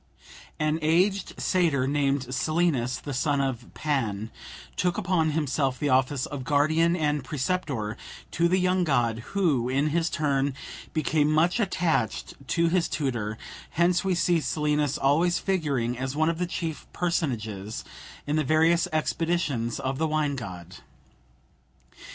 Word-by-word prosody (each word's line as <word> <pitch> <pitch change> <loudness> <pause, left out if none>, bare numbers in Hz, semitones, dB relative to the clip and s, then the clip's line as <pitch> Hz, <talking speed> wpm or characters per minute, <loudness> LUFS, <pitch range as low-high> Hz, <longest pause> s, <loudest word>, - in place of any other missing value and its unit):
An 155 +1 +1
aged 180 +5 +1
satyr 160 -8 +2
named 140 -2 0
Silenus, 155 -5 +1
the 145 - -6
son 140 +2 +1
of 130 -3 -2
Pan, 115 -8 -1 0.4
took 180 -1 0
upon 175 -4 +1
himself 140 -3 0
the 145 - -1
office 130 +1 +2
of 140 -3 -6
guardian 155 +4 +3
and 150 -4 0
preceptor 135 - -2 0.4
to 170 +1 +2
the 185 +2 +2
young 185 0 +2
god, 120 -7 +1 0.2
who, 145 -11 +2
in 140 +4 +1
his 165 +1 +1
turn, 140 -3 0 0.4
became 155 -1 +1
much 165 +7 +3
attached 180 -5 0
to 170 - +1
his 175 0 +2
kind - - -8
tutor; 115 -7 -2 0.3
hence 175 +1 +2
we 190 -1 +1
see 175 0 +2
Silenus 150 -2 0
always 165 +6 +3
figuring 140 -11 0
as 130 +1 -3
one 155 +2 +2
of 165 0 -2
the 180 - 0
chief 165 -3 -4
personages 110 - -2 0.4
in 150 +1 0
the 155 - +2
various 160 +4 +3
expeditions 155 -6 -1
of 135 +1 -2
the 160 - +2
wine 150 -2 0
god. 90 -7 -8
150 Hz, 145 wpm, -26 LUFS, 130-170 Hz, 0.4 s, guardian